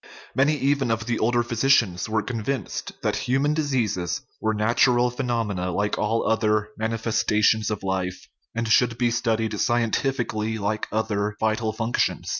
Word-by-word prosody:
Many 145 +3 +3
even 140 -2 +1
of 115 -1 -1
the 120 -1 -1
older 120 +1 +2
physicians 115 -5 +2
were 110 -1 0
convinced 125 +3 -3
that - - +1
human 140 +4 +2
diseases 120 - -1 0.2
were 110 0 0
natural 120 +3 +3
phe 125 - -16
nomena, 105 -7 -1
like 105 0 0
all 110 +2 0
other 105 -1 +1
manifestations 110 -1 +1
of 105 -2 -4
life, 95 -1 -3 0.3
and 115 0 -1
should 115 +2 +3
be 120 -1 +1
studied 110 -2 0
scientifically, 115 -2 0
like 105 +1 -2
other 105 -1 -1
vital 110 0 0
functions. 115 +2 -1
115 Hz, 145 wpm, -24 LUFS, 105-120 Hz, 0.3 s, Many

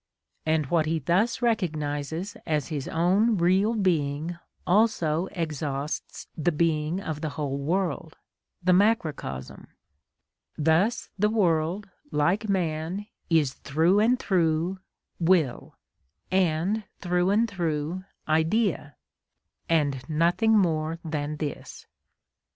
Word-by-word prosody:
And 155 -1 +2
what 160 -3 +2
he 165 +1 +1
thus 185 - +1
recognises 160 -4 -1
as 150 -2 0
his 145 -4 -3
own 195 +7 +2
real 190 +6 +3
being 165 -4 0 0.3
also 180 -4 +2
exhausts 150 -4 -4
the 165 +2 +1
being 155 +1 0
of 160 -6 -5
the 155 - -2
whole 140 -2 -2
world—the 175 +2 -2
macrocosm; 165 - 0 0.9
thus 165 +9 +1
the 210 +2 +3
world, 180 -2 +1 0.2
like 175 +8 +1
man, 175 +1 -1 0.2
is 155 -5 +3
through 165 +8 +2
and 235 +4 +4
through 175 -3 0 0.4
will, 165 -7 +1 0.6
and 185 +3 +1 0.2
through 180 0 +1
and 220 +4 +3
through 170 -2 -2 0.2
idea, 160 0 +1 0.7
and 145 -5 +1
nothing 175 +8 +3
more 160 -4 +1
than 150 -1 -3
this. 150 -2 -6
165 Hz, 105 wpm, -26 LUFS, 155-190 Hz, 0.9 s, and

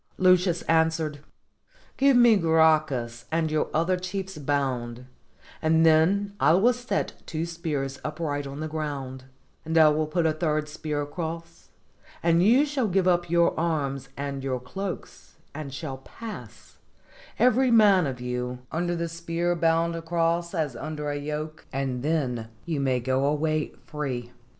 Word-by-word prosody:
Lucius 180 -1 +3
answered, 160 -2 +1 0.8
"Give 275 -1 +4
me 240 -2 +7
Gracchus 155 - +2
and 160 -1 0
your 155 - +1
other 170 +4 +1
chiefs 185 -1 -5
bound, 130 -4 -2 0.6
and 160 0 +3
then 185 +6 +3
I - - +5
will 220 +8 +4
set 245 -5 -2
two 160 0 -2
spears 150 -5 -3
up 155 +2 -5
right 145 -3 -2
in 140 +2 -7
the 155 - -2
ground, 140 -4 -5 0.4
and 160 +1 -1
I 155 -1 +8
will 155 +1 0
put 170 +2 0
a 160 - +3
third 155 -1 -1
spear 150 -1 -3
across, 165 +2 -6 0.5
and 170 0 +4
you 240 +10 +5
shall 280 -5 -1
give 185 -1 +1
up 175 -1 +2
your 170 0 +3
arms 140 -5 -1
and 140 -1 -4
your 130 -2 -1
cloaks, 190 +10 -7 0.2
and 150 -2 -6
shall 140 -1 -5
pass, 135 - -10 0.6
every 255 +2 +4
man 205 -7 +5
of 130 -2 -5
you, 125 0 -3
under 175 +2 -1
the 170 0 -2
spear 170 +1 -2
bound 165 0 +2
across 170 +1 -1
as 150 -6 -1
under 150 +2 -4
a - - -3
yoke, 150 +2 -5
and 135 -2 -2
then 130 -7 -1 0.2
you 160 -4 -2
may 130 -2 +1
go 130 +2 0
away 155 +1 0
free." 130 -6 -4
160 Hz, 155 wpm, -26 LUFS, 140-170 Hz, 0.8 s, I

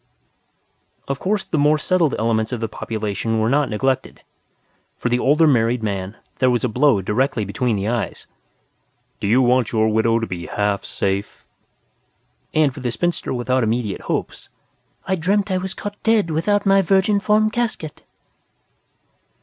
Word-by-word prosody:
Of 140 0 -3
course 200 +1 0
the 155 - -2
more 150 +2 +4
settled 165 -1 +1
elements 110 0 0
of 125 - -3
the 115 - -2
population 110 0 -3
were 110 +2 +1
not 145 -1 +2
neglected. 130 +4 -2 0.7
For 125 - -2
the 120 +1 +1
older 150 +6 +4
married 120 -4 +2
man, 100 0 -3 0.2
there 130 - +4
was 120 -1 +1
a - - +2
blow 125 -3 +2
directly 115 +2 0
between 115 +4 -1
the 100 +1 -2
eyes: 120 0 -3 0.9
"Do - - -2
You 125 +5 +4
Want 125 -2 +2
Your 110 -1 +2
Widow 110 +1 +2
to 115 - -1
Be 90 -4 -6
Half 105 -1 -1
Safe?" 100 +1 -3 1.1
And, 155 -4 +2
for - - -9
the 125 -2 -2
spinster 175 +9 -2
without 130 +1 0
immediate 110 -2 -1
hopes, - - -4 0.6
"_I 190 -2 0
Dreamt 195 +4 +1
I 185 - +1
Was 190 0 -5
Caught 205 0 -7
Dead 220 -6 +2
Without 205 +7 +1
My 195 0 +5
Virginform 205 +3 +2
Casket! 225 -10 -3
125 Hz, 160 wpm, -21 LUFS, 110-170 Hz, 1.1 s, My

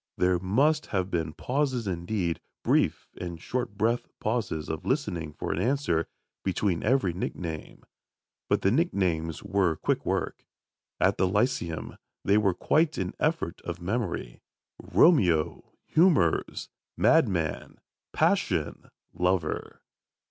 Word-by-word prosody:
There 90 -1 +3
must 140 - +2
have 95 -1 -1
been 80 -2 -1
pauses 130 -3 -1
indeed, 85 -1 -2 0.2
brief - - +2
and 85 -2 -5
short 120 +1 -3
breath'd 115 +3 +1
pauses 105 -9 -2
of 80 - -4
listening 95 - -1
for - - -4
an 85 - -2
answer, 120 - +1 0.4
between 95 -2 0
every 130 -10 +2
nickname. 85 -3 -5 0.7
But - - +2
the 95 - +4
nicknames 90 - 0
were 95 -5 +1
quick - - -1
work. - - -2 0.6
At - - +3
the 95 - +4
Lyceum 95 -5 -1 0.3
they 100 +2 +4
were 100 -4 +2
quite 155 0 +2
an - - -2
effort 155 - -1
of 85 -1 -5
memory: 90 - -3 0.4
"Romeo! 90 - +3
Humours! 155 - +2 0.3
Madman! 85 -5 +2 0.3
Passion! - - 0 0.2
Lover!" 90 -3 -1
95 Hz, 120 wpm, -28 LUFS, 85-125 Hz, 0.7 s, the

